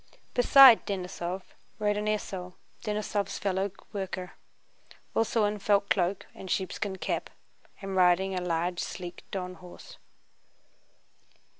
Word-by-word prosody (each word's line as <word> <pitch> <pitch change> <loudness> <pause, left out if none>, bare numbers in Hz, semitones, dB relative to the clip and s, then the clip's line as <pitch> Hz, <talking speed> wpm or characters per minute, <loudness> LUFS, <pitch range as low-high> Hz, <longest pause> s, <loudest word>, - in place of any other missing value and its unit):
Beside 250 -1 +8
Denísov 185 -1 -4 0.3
rode 210 -1 +1
an 210 0 -2
esaul, 190 -4 -3
* - - -35
Denísov's 210 -1 -2
fellow 195 0 -1 0.2
worker, 190 -2 -4 0.8
also 225 -1 +2
in 205 0 -1
felt 200 0 +2
cloak 185 0 +1
and 190 - -10
sheepskin 190 +1 -2
cap, - - -2 0.5
and 195 -1 -4
riding 185 +1 +4
a 180 - -2
large 175 0 -1
sleek 175 -1 -6
Don 185 -2 -4
horse. 180 0 -13
190 Hz, 120 wpm, -29 LUFS, 180-205 Hz, 0.8 s, Beside